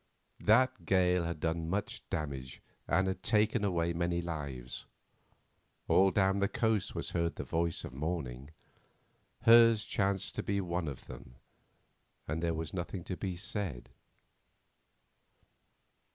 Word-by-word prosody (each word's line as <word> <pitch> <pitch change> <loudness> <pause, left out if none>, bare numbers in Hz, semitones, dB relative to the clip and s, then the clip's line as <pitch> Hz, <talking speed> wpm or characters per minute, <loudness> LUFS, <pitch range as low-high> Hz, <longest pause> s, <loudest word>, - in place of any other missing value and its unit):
That 130 +4 +3
gale 90 -2 +3
had 85 -2 -3
done 80 +1 -1
much 100 +3 -2
damage 65 -4 -4 0.3
and 95 +1 +1
taken 110 +1 +2
away 85 -4 +1
many 85 0 0
lives—all 75 +4 -3
down 95 0 +2
the 100 - +3
coast 110 -2 0
was - - -4
heard 85 -1 0
the - - -4
voice 85 0 -1
of - - -9
mourning; 70 -3 -4 0.9
hers 115 -1 +7
chanced 100 -2 0
to - - +1
be 100 0 -1
one 90 -3 -2
of 70 -3 -6
them, 60 - -11 0.9
and 75 +3 -2
there 85 -1 0
was 80 0 -4
nothing 90 0 -4
to 90 - -4
be 95 -1 -4
said. 100 - -4
90 Hz, 125 wpm, -32 LUFS, 80-100 Hz, 0.9 s, hers